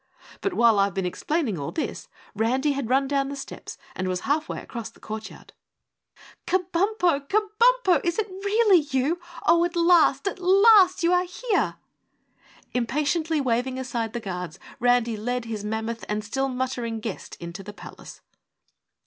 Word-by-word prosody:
But 395 -2 -1
while 230 -3 +5
I've 195 -1 +1
been 190 -1 -1
explaining 230 - -1
all 140 - -4
this, 320 - -4 0.3
Randy 255 +7 +1
had 275 -4 -3
run 270 +1 +2
down 275 -1 0
the 280 - -5
steps 275 - -8 0.2
and 185 - -2
was 185 -1 -2
half 305 +3 0
way - - -4
across 235 -3 -7
the - - -22
courtyard. 220 0 -8 0.9
"Kabumpo, 360 -4 +1
KABUMPO, 430 0 +3
is 345 -1 -1
it 435 -1 0
really 400 +1 +3
you? 290 +3 -1 0.3
Oh, 340 0 +5
at 345 0 -2
last 340 -3 +4
AT 395 - -3
LAST 380 0 +6
you 340 +1 +3
are 360 0 +3
here!" 400 +4 -1 1.0
Impatiently 300 +6 0
waving 255 0 0
aside 240 -4 -3
the 240 - -2
guards, 180 -6 -6 0.2
Randy 245 -1 +2
led 245 +3 -2
his 220 -3 -5
mammoth 220 +1 -3
and 210 0 -1
still 270 +6 -1
muttering 250 -3 -3
guest 215 -3 -6
into 170 +3 -7
the 205 +2 -8
palace. - - -12
270 Hz, 155 wpm, -25 LUFS, 225-355 Hz, 1.0 s, LAST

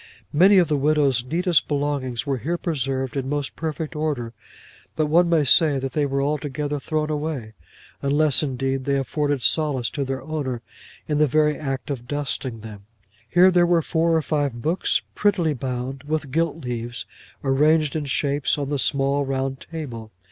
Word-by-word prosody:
Many 190 +6 +6
of 175 -3 +5
the 150 - +1
widow's 140 -4 +2
neatest 170 +5 +1
belongings 140 -4 -1
were 135 -3 -1
here 170 +10 -2
preserved 135 -6 -2
in 135 -1 -2
most 145 -1 -2
perfect 160 -1 -4
order; 145 -7 -2 0.6
but 155 - +1
one 170 +3 +3
may 165 -3 +3
say 145 +1 +5
that 135 0 -3
they 150 -2 +1
were 140 0 0
altogether 145 0 -2
thrown 155 +2 -2
away, 145 -7 -3 0.5
unless 145 0 +3
indeed 135 -2 -2
they 140 -1 +1
afforded 145 0 -1
solace 145 -7 +1
to 145 - -2
their 135 -1 -4
owner 135 -6 -3 0.4
in 150 -1 0
the 150 - +5
very 150 +2 +2
act 135 -2 -4
of 125 -3 -5
dusting 130 -4 -3
them. 105 -2 -10 0.4
Here 180 +1 +6
there 175 -1 +4
were 170 -2 +3
four 165 +1 +1
or 160 - +1
five 145 -6 -1
books, 170 +4 +1
prettily 185 -7 +2
bound, 130 0 -4
with 150 -1 -3
gilt 165 -1 -1
leaves, 120 0 -4 0.4
arranged 150 +2 +3
in 155 -2 -2
shapes 140 +1 0
on 140 -1 -3
the 145 - 0
small 140 +2 +1
round 135 0 -3
table. 125 -9 -6
145 Hz, 170 wpm, -23 LUFS, 135-155 Hz, 0.6 s, Many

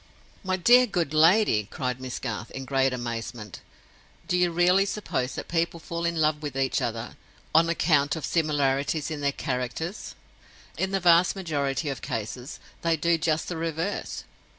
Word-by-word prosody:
"My 185 -1 0
dear 245 +7 +6
good 170 -8 -1
lady!" 160 - +4
cried 125 -1 -3
Miss 130 -1 -5
Garth, 115 -2 -5
in 135 0 -7
great 135 0 +2
amazement; 115 -4 -5 0.7
"do - - +1
you 180 0 +3
really 180 +3 +4
suppose 195 -10 -3
that - - -6
people 170 0 -1
fall 170 +1 -4
in 170 0 0
love 155 -1 +2
with 145 -3 -5
each 135 -1 +1
other 115 0 -4 0.4
on 165 +1 +5
account 145 -4 +2
of 160 - -4
similarities 145 -1 0
in 150 -2 -4
their 140 0 +1
characters? 130 - -4 0.6
In 190 - -1
the 195 0 0
vast 175 +1 +5
majority 150 -5 -2
of 135 - -4
cases, 120 +5 -5 0.2
they 165 -1 +1
do 170 +2 +2
just 160 -1 0
the 175 - -4
reverse. 165 +4 -3
155 Hz, 165 wpm, -26 LUFS, 135-170 Hz, 0.7 s, dear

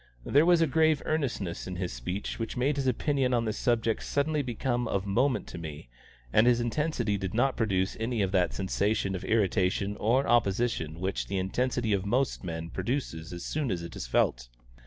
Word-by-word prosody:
There 150 +4 +4
was 175 -2 +5
a - - +5
grave 155 +1 +2
earnestness 125 - -2
in 90 - -4
his 90 -4 -3
speech 90 - -4
which 115 +1 -4
made 135 +4 +1
his 135 -1 0
opinion 130 0 +1
on 115 -1 +1
this 110 - -2
subject 115 -2 +1
suddenly 150 +1 0
become 120 -1 -1
of 100 -2 -1
moment 125 +7 +1
to - - -7
me, 75 -5 -8 0.4
and 110 +3 +5
his 120 -1 +4
intensity 120 -4 0
did 95 +1 -4
not 130 +3 +2
produce 95 -4 0
any 115 -1 0
of 95 - -1
that 90 -3 +2
sensation 100 +1 0
of 95 - -4
irritation 100 -2 +1
or 125 +6 +2
opposition 100 -8 +1
which 95 +2 -2
the 100 - -2
intensity 115 +4 0
of 95 -2 +1
most 125 +5 0
men 80 -1 -5
produces 95 - -3
as 85 0 -6
soon 150 -4 -1
as 90 -4 -2
it 85 - -8
is - - -5
felt. - - +1
110 Hz, 195 wpm, -29 LUFS, 95-130 Hz, 0.4 s, was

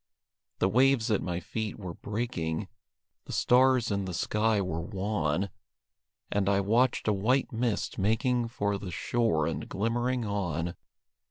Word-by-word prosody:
The - - +2
waves 125 +1 +3
at 105 - +2
my 90 -1 -2
feet 110 +4 -4
were 90 -4 -6
breaking; 105 -6 -3 0.6
The - - -8
stars 125 -2 +4
in 100 -1 0
the 90 -2 -4
sky 105 +3 +1
were 90 -4 -2
wan; 95 -2 -1 0.8
And 100 -1 +1
I 100 0 +3
watched 115 +6 +2
a 105 - +4
white 125 +9 +1
mist 115 -3 -1
making 115 +4 +1
For 100 -3 -1
the 95 - -6
shore 105 -5 +1
and 80 - -3
glimmering 120 +3 0
on. 90 -5 -2
105 Hz, 145 wpm, -29 LUFS, 95-115 Hz, 0.8 s, stars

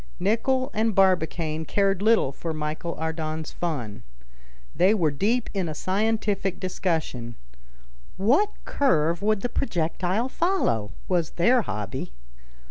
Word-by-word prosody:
Nicholl 245 +7 +1
and 220 -1 +1
Barbicane 165 -4 +2
cared 195 +3 +1
little 220 -9 +4
for 160 +3 -5
Michel 155 +2 -3
Ardan's 160 -1 -3
fun. 120 -11 -4 0.7
They 185 +6 +4
were 165 -7 +2
deep 220 - 0
in 190 -5 -1
a 155 - -5
scientific 200 0 0
discussion. 160 -10 -2 0.8
What 270 - +3 0.2
curve 170 - +2
would 215 -1 +1
the - - 0
projectile 185 +1 -1
follow? 265 - 0 0.2
was 175 -4 0
their 240 +8 +4
hobby. 105 - -5
180 Hz, 120 wpm, -25 LUFS, 155-215 Hz, 0.8 s, little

